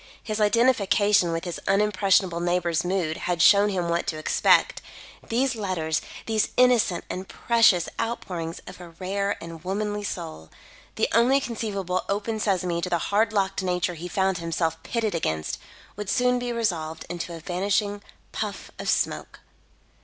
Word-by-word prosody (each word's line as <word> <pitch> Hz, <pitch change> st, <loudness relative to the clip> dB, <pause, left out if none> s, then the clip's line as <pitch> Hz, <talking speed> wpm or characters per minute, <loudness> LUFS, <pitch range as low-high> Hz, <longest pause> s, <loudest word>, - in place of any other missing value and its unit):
His 215 Hz, -1 st, -3 dB
identification 210 Hz, -4 st, +3 dB
with 165 Hz, 0 st, -2 dB
his 175 Hz, -, -4 dB
unimpressionable 195 Hz, -3 st, +2 dB
neighbour's 175 Hz, -2 st, 0 dB
mood 175 Hz, -3 st, -1 dB
had 175 Hz, -1 st, -2 dB
shown 205 Hz, +3 st, +6 dB
him 180 Hz, -3 st, -1 dB
what 170 Hz, 0 st, -1 dB
to 155 Hz, -, -2 dB
expect. 155 Hz, -, +3 dB, 0.5 s
These 260 Hz, +3 st, +1 dB
letters 180 Hz, -7 st, -1 dB, 0.2 s
these 220 Hz, -1 st, +1 dB
innocent 245 Hz, -8 st, +3 dB
and 185 Hz, +1 st, -5 dB
precious 230 Hz, -7 st, +3 dB
outpourings 175 Hz, -8 st, -4 dB
of 185 Hz, 0 st, -11 dB
a 175 Hz, -, -10 dB
rare 195 Hz, +4 st, -2 dB
and 165 Hz, -1 st, -9 dB
womanly 205 Hz, +2 st, -2 dB
soul 160 Hz, -, -6 dB, 0.5 s
the -, -, +1 dB
only 250 Hz, +4 st, +5 dB
conceivable 200 Hz, -7 st, -3 dB
open 210 Hz, +2 st, -1 dB
sesame 180 Hz, -4 st, 0 dB
to 180 Hz, -, -2 dB
the 175 Hz, -, +2 dB
hard 215 Hz, +6 st, +1 dB
locked 195 Hz, -2 st, 0 dB
nature 180 Hz, -1 st, 0 dB
he 170 Hz, +1 st, -7 dB
found 190 Hz, 0 st, 0 dB
himself 165 Hz, -1 st, -2 dB
pitted 225 Hz, -3 st, -2 dB
against, 80 Hz, -, -2 dB, 0.4 s
would 210 Hz, -1 st, -5 dB
soon 250 Hz, +2 st, +2 dB
be 245 Hz, 0 st, -3 dB
resolved 170 Hz, -9 st, -2 dB
into 170 Hz, 0 st, -5 dB
a -, -, -8 dB
vanishing 200 Hz, +4 st, -1 dB, 0.3 s
puff -, -, -5 dB
of -, -, -3 dB
smoke. -, -, -1 dB
190 Hz, 155 wpm, -25 LUFS, 170-210 Hz, 0.5 s, shown